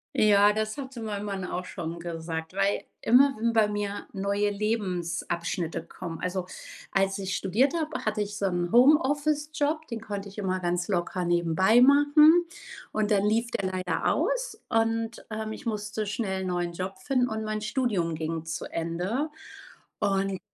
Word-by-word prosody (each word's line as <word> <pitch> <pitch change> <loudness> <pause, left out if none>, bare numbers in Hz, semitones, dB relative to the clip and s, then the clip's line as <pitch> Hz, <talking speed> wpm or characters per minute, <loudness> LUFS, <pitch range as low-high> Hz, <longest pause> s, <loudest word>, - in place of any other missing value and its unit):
Ja, 205 -1 +5
das 215 0 -2
hatte 265 -3 -7
mein 210 -2 -4
Mann 195 -2 -3
auch 180 0 -4
schon 170 -1 -6
gesagt, 165 -1 -5
weil, 195 +1 +1 0.2
immer 265 +5 +5
wenn 230 +1 +1
bei 220 -2 +4
mir 205 -1 -3
neue 200 +1 0
Lebensabschnitte 175 -5 -2
kommen 170 -2 -7
also, 180 0 -2 0.4
als 195 0 +1
ich 190 -1 -2
studiert 235 - +2
habe, 315 -2 -2
hatte 215 -1 -1
ich 205 0 -3
so 200 - 0
'n 175 -1 -1
Homeoffice-Job, 295 +3 +3
den 230 -2 -5
konnte 205 -2 -5
ich 200 - -13
immer 185 -2 -1
ganz 175 -1 -1
locker 180 -1 -1
nebenbei 175 +6 +3
machen 290 +5 +6 0.5
und 215 0 0
dann 200 0 +3
lief 230 +3 +1
der 190 -1 -1
leider 185 -1 0
aus - - -1
und, 225 0 0
ähm, 220 0 -4
ich - - -9
musste 215 -1 -3
schnell 195 -3 -2
'n - - -3
neuen 175 -1 -1
Job 185 +2 -5
finden 250 +6 +1
und 220 -1 -3
mein 215 0 -2
Studium 210 - 0
ging 160 0 -3
zu 160 -1 -4
Ende 180 - -2 0.7
und 195 -2 0
205 Hz, 165 wpm, -27 LUFS, 180-230 Hz, 0.7 s, machen